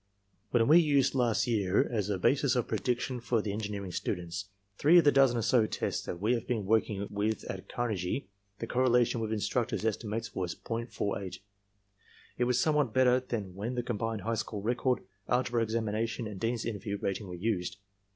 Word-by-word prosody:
"When 115 -2 +3
we 160 +4 +8
used 140 -4 +3
last 120 -4 +2
year 100 -5 +2
as 105 -4 -1
a 100 - 0
basis 135 +7 +2
of 125 - 0
prediction 125 +3 -1
for 120 0 0
the 105 -1 -2
en 105 - -3
gineering 100 -4 -4
students, 90 +1 -3 0.3
three 160 +5 +6
of 170 - +7
the 145 - +7
dozen 135 -3 +4
or 115 - 0
so 115 -2 +4
tests - - -2
that 85 - -4
we 110 +6 +2
had 115 -1 -2
been 110 -5 -1
working 105 -1 +1
with 105 +1 -1
at 95 0 -7
Carnegie, 110 -1 -2 0.3
the 115 - -4
correlation 120 -1 +2
with 110 -1 -2
instructors' 110 +2 -1
estimates 110 +1 -2
was 90 -2 -3
.48. 100 -5 -4 1.0
It - - +3
was 125 0 +2
somewhat 150 -6 +2
better 130 -1 +5
than 110 -7 -4
when 110 +7 -4
the 120 - -1
combined 115 -2 -2
high 115 +3 -1
school 110 -2 -3
record, 125 +2 0 0.3
algebra 125 -1 +1
examination 115 +1 -1
and 105 -3 -6
Dean's 115 +2 -1
interview 105 -2 -3
rating 100 +1 -3
were 90 - -6
used. 95 -1 -2
115 Hz, 185 wpm, -30 LUFS, 100-125 Hz, 1.0 s, we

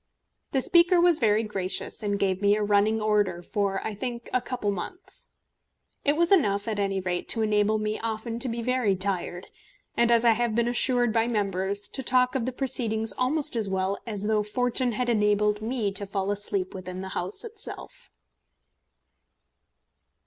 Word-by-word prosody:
The 265 - +1
Speaker 345 +4 +4
was 345 -2 +4
very 220 -1 +3
gracious, 195 -4 -3
and 205 -1 -1
gave 190 -1 0
me 205 0 +4
a 210 - -1
running 210 +2 +2
order 205 -5 +1
for, 195 0 -2
I 220 - -3
think, 235 +2 -5
a 255 - +2
couple 245 -6 -2
of - - -3
months. 365 - -6 0.7
It 290 +1 +3
was 340 +3 +1
enough, 205 - +3
at 215 -2 -2
any 195 -1 0
rate, 180 -1 -3
to 225 - +2
enable 210 0 +2
me 215 0 -2
often 225 +1 -4
to 255 - -1
be 230 0 -3
very 250 -5 +1
tired, 185 -1 -3 0.5
and, 235 0 +3
as 235 0 +4
I 235 - +7
have 235 -1 0
been 235 0 +2
assured 245 -1 +2
by 225 0 +2
members, 200 -2 -1
to 265 - -3
talk 250 0 +2
of 255 -2 -1
the - - -1
proceedings 225 -5 0
almost 270 +4 0
as 220 -4 0
well 190 +1 -1
as 205 -3 -2
though 215 0 +1
Fortune 245 +3 -1
had 245 +3 -2
enabled 210 -2 +2
me 220 -2 -1
to 200 +1 -2
fall 195 0 -2
asleep 200 -2 -1
within 185 -1 -7
the 190 - -6
House 185 +2 0
itself. 440 -2 -7
215 Hz, 180 wpm, -26 LUFS, 200-245 Hz, 0.7 s, I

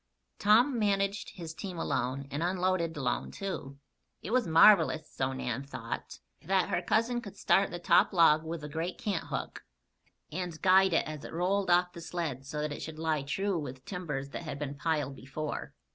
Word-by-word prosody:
Tom 235 +5 +4
managed 200 -1 0
his 165 -4 -7
team 180 +2 -6
alone, 130 -2 -2
and 145 - -3
unloaded 180 -2 0
alone, 130 -3 -1
too. 155 -8 -5 0.5
It 195 - -5
was 250 -1 +2
marvelous 165 -1 +6
(so 130 0 -2
Nan 130 0 -3
thought) 140 - -6 0.2
that 190 +2 +1
her - - 0
cousin 230 +6 +1
could 200 -4 -10
start 195 0 +3
the 175 - -5
top 175 0 +4
log 160 -4 +5
with 160 0 -5
the 150 - -6
great 165 +4 -3
canthook, 200 -6 -3 0.7
and 175 -1 -4
guide 190 0 +6
it - - +3
as 155 -2 -6
it - - -8
rolled 185 +3 0
off 180 0 +3
the 170 - -9
sled 160 -6 -4
so 150 +1 -3
that 150 0 -2
it - - -7
should 160 -1 -6
lie 160 -2 0
true 190 +6 -1
with 130 -3 -7
timbers 145 -8 -4
that - - -5
had 150 -4 -5
been 145 -1 -4
piled 145 -2 -1
before. 145 +4 -5
165 Hz, 185 wpm, -30 LUFS, 150-190 Hz, 0.7 s, marvelous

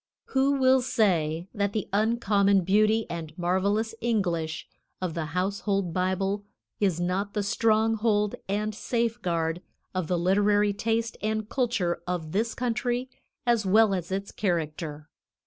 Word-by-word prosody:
"Who 270 +1 +3
will 260 -1 +4
say 175 -9 +1
that 200 -1 -1
the 215 - -2
uncommon 205 -2 +3
beauty 215 +4 +3
and 160 -2 -6
marvelous 200 +5 0
English 175 -9 -1 0.3
of 185 -3 -2
the 160 -1 -2
household 195 -1 0
Bible 190 +2 0 0.4
is 190 -5 +1
not 190 +3 -1
the 205 - 0
stronghold 220 0 +2 0.2
and 210 +2 -1
safeguard 185 -8 -1 0.3
of 185 -4 -2
the 180 - +1
literary 205 +3 +3
taste 225 +2 -1
and 215 0 -1
culture 220 -10 0
of 170 -3 -3
this 225 +5 0
country 245 +1 -1 0.3
as 235 -3 +3
well 205 +2 +4
as 180 -1 -3
its 195 +1 -3
character. 155 -5 -2
200 Hz, 130 wpm, -27 LUFS, 180-225 Hz, 0.4 s, will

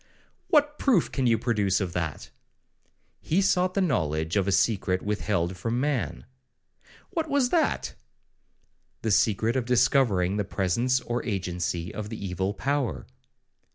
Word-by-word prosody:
'What 295 -1 +2
proof 240 - +2
can 130 -3 0
you 115 -1 +4
produce 105 -6 +1
of 95 -4 -3
that?'—'He 90 - -6
sought 185 -2 +2
the 195 - +2
knowledge 80 - 0
of 100 -2 +1
a - - +2
secret 95 -1 +1
withheld 100 -4 -1
from 115 +7 -2
man.' 140 -2 -2 0.9
'What 325 -5 -2
was 275 -3 +2
that?'—'The 310 - -5
secret 110 +3 +2
of 130 -2 0
discovering 110 -6 +2
the 105 - +1
presence 115 +8 0
or 120 0 -3
agency 90 -3 -3
of 105 -1 -5
the 110 - -6
evil 95 +1 -3
power.' 140 -5 -1
110 Hz, 130 wpm, -26 LUFS, 95-135 Hz, 0.9 s, you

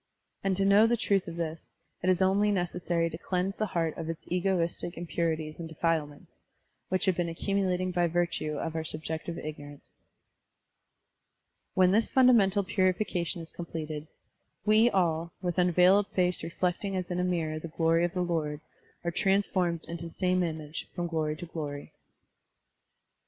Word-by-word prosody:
And 195 -1 +1
to 195 - +2
know 205 +3 +6
the 240 +1 +2
truth 200 -4 +1
of 165 - -6
this, 165 -1 -5 0.3
it 185 - +1
is 185 0 +3
only 200 +2 +3
necessary 175 -3 0
to 160 - -7
cleanse 185 +2 -1
the 215 - 0
heart 165 -4 -1
of 165 0 -4
its 165 - -5
egoistic 175 -1 -1
impurities 165 -2 -2
and 165 -1 -6
defilements, 160 -2 -2 0.5
which 185 0 +1
have 190 -2 +3
been 175 -1 -1
accumulating 185 +1 0
by 175 -1 +2
virtue 170 -3 -1
of 160 +1 -3
our 160 - -1
subjective 160 +2 -4
ignorance. 145 -2 -9 1.7
When 185 -1 +5
this 220 +3 +3
fundamental 220 -7 +5
piuification 185 -2 0
is 165 - -12
completed, 155 -3 -5 0.6
"we 220 +2 +5
all, 170 -4 0
with 175 -3 -2
tmveiled 180 +3 +5
face 180 -2 0
reflect 175 +3 -2
ing 195 -1 -2
as 185 -1 -3
in 180 - -1
a - - +1
mirror 165 -4 -1
the 165 - -6
glory 165 +1 +2
of 175 +2 -1
the 180 - +1
Lord, 155 -4 -1 0.4
are 170 - -1
transformed 190 -3 +1
into 170 0 -5
the 165 - -13
same 185 -1 +2
image, 155 -3 -4
from 175 -1 -2
glory 160 -2 -1
to 175 - -7
glory.' 145 -4 -6
175 Hz, 160 wpm, -29 LUFS, 160-185 Hz, 1.7 s, know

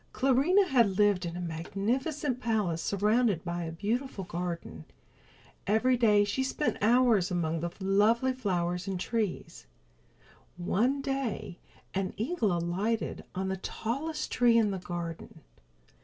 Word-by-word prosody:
Clarinha 275 +2 +4
lived 200 -3 +2
in 170 +1 -5
a - - -4
magnificent 235 - -2
palace 210 -9 0
surrounded 210 -2 +1
by 175 0 -3
a 165 - -4
beautiful 215 +5 -2
garden. 170 - -5 0.8
Every 225 +5 +3
day 210 -4 +4
she 205 +6 -1
spent 290 +3 -1
many 215 +3 +4
hours 235 -7 +4
among 165 -3 -1
the 170 +2 -2
lovely 210 +7 +3
flowers 180 -7 -2
and 190 -2 -2
trees. 220 -2 -3 0.9
One 240 +10 0
day 270 -9 -3 0.3
an 190 -1 -2
eagle 225 - 0
alighted 180 +7 -1
on 190 +1 -2
the 190 - -2
tallest 275 - -4
tree 240 -2 +4
in 215 -3 +3
the 190 - -3
garden. 170 -2 -6
205 Hz, 130 wpm, -29 LUFS, 180-245 Hz, 0.9 s, Clarinha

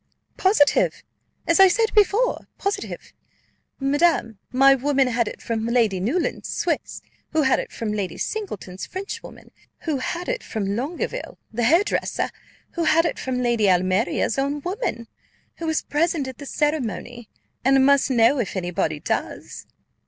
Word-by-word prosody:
"Positive! 375 -7 +3 0.4
as 335 +2 +3
I 385 - +9
said 445 +4 +1
before, 425 +3 +2
positive! 400 +1 -4 0.7
Madam, 275 - +1
my 270 +2 +6
woman 270 0 +2
had 235 -2 0
it - - -7
from 225 -1 -2
Lady 230 -5 +2
Newland's 265 - -1
Swiss, - - -2 0.3
who 315 -1 +3
had 265 - +3
it - - -5
from 215 -2 -3
Lady 200 -3 -3
Singleton's 205 - -5
Frenchwoman, 390 +2 -8 0.3
who 310 -4 -1
had 345 +7 -4
it - - -1
from 200 -3 -3
Longueville, 330 - -4 0.2
the 235 +1 0
hairdresser, 335 - +1 0.4
who 340 -2 -2
had 325 +1 +4
it - - -2
from 250 -1 -2
Lady 235 -4 +2
Almeria's 185 +6 +1
own 285 +2 -1
woman, 355 - -3 0.5
who 330 - -4
was 320 -1 0
present 305 -2 0
at 260 - -8
the 285 - -8
ceremony, 245 - -2 0.3
and 270 +1 +5
must 280 -1 +4
know 250 +2 +4
if 220 - -2
any 180 -2 -2
body 155 -3 -1
does." - - -4
270 Hz, 150 wpm, -23 LUFS, 230-330 Hz, 0.7 s, I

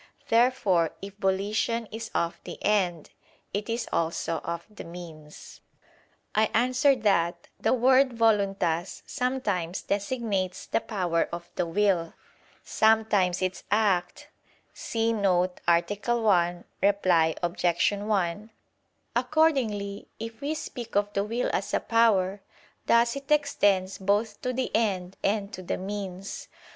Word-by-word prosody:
Therefore, 225 -8 +3
if 200 0 -7
volition 210 +4 0
is 225 +1 -6
of 170 0 -1
the - - -8
end, 180 -6 +1 0.4
it 205 +3 -3
is 230 +1 -2
also 165 0 -1
of 170 0 -5
the 210 - -10
means. 165 -3 -11 0.7
I 215 0 +3
answer 255 +4 +4
that, 175 -6 0
The - - +2
word 260 +1 +4
"voluntas" 195 -6 +1
sometimes 210 -10 -2
designates 200 -3 -2
the - - 0
power 180 -7 -1
of 170 0 -7
the 175 - -1
will, 175 -2 +1 0.5
sometimes 215 -5 +2
its 185 0 -2
act 205 -4 +1 0.5
[*See 230 0 -1
note 185 -4 +1
to 170 0 +5
A. 205 +4 -1
1, 175 -5 +2 0.2
Reply 180 -5 +3
Obj. 175 0 -2 0.3
1]. 205 -1 -1 0.7
Accordingly, 240 -7 +1
if 225 +1 -7
we 295 +3 -1
speak 240 -7 -7
of 205 0 +1
the 200 - +1
will 230 +4 -1
as - - -1
a - - +2
power, 205 -4 +2 0.5
thus 235 +1 +4
it 275 +1 -8
extends 205 -11 +2
both 205 +2 0
to 255 - -1
the 255 +1 -2
end 195 -5 0
and 200 0 0
to 185 - -6
the 180 - -3
means. 195 -1 -6
205 Hz, 130 wpm, -27 LUFS, 180-230 Hz, 0.7 s, to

